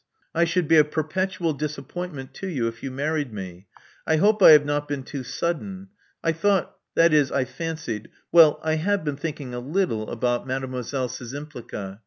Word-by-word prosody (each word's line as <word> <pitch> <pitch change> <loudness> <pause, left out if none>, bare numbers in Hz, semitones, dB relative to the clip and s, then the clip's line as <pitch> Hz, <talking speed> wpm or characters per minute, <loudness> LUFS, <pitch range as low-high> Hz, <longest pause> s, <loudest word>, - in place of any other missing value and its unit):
I 170 +1 +3
should 170 0 0
be 160 +1 +6
a 155 - +8
perpetual 165 +3 -1
disappointment 150 0 -5
to 195 - -6
you 135 -10 -1
if 115 0 -6
you 135 - -4
married 145 0 -2
me. 95 -2 -8 0.4
I 160 - +4
hope 210 +6 +3
I - - +10
have 150 -2 +8
not 145 0 -1
been 145 -2 -3
too 135 +1 -6
sudden. 185 +8 -3 0.3
I 165 - +3
thought 185 +2 +1
— - - -59
that 165 -1 +5
is, 145 -3 +4
I 135 -2 +1
fancied 155 -7 -5 0.2
Well, 165 -3 +7
I 160 0 +1
have 200 +3 0
been 150 -2 -2
thinking 145 -4 -5
a 120 - -3
little 130 - -1
about 120 +2 -1
Mdlle. 130 -2 -3 0.2
Szczympliga. 120 -7 -7
150 Hz, 185 wpm, -24 LUFS, 130-165 Hz, 0.4 s, I